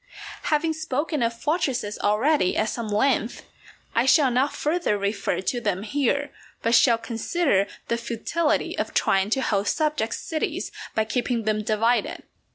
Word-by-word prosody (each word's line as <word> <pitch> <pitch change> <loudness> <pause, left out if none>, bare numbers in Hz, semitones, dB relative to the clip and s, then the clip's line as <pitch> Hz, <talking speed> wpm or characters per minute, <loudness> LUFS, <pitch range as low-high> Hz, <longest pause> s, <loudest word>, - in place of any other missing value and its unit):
Having 320 +1 +1
spoken 305 -1 -2
of 230 0 -1
fortresses 265 - -1
already 215 +2 +2
at 215 0 +1
some 235 -2 -4
length, 225 +2 0 0.5
I 235 +3 +2
shall 275 -2 +5
not 260 +4 +1
further 305 -8 0
refer 200 -1 -1
to 240 +5 -2
them 200 -3 -1
here, 280 +4 0 0.3
but 230 - +1
shall 235 0 +5
consider 230 - 0 0.2
the 235 - 0
futility 240 +8 -1
of - - -3
trying 195 +1 +2
to 265 +4 +1
hold 200 -3 0
subject 300 -8 0
cities 315 -1 -3 0.2
by 220 - +2
keeping 235 +1 -1
them 215 0 0
divided. 225 +3 0
235 Hz, 150 wpm, -24 LUFS, 215-290 Hz, 0.5 s, shall